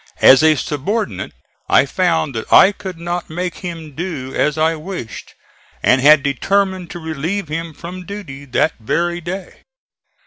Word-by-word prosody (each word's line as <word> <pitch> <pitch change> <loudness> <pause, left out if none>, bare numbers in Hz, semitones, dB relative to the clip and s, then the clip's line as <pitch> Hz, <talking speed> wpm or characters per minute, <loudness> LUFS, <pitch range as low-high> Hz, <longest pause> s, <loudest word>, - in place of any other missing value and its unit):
As 135 +1 +8
a 155 0 +5
subordinate 145 - -3 0.4
I - - +5
found 165 -1 0
that 110 -1 -6
I 195 - +8
could 190 -4 -8
not 175 +1 -4
make 175 +2 -4
him 165 -5 -7
do 150 -5 -5
as 150 0 +1
I 160 +1 +2
wished, 160 -7 -7 0.5
and 130 +1 +4
had 150 +1 +6
determined 190 +6 0
to - - -7
relieve 160 +3 -3
him 165 +1 -4
from 175 +4 -9
duty 190 -9 -8
that 140 +4 +1
very 175 +10 -1
day. 180 +2 -6
165 Hz, 150 wpm, -18 LUFS, 145-180 Hz, 0.5 s, As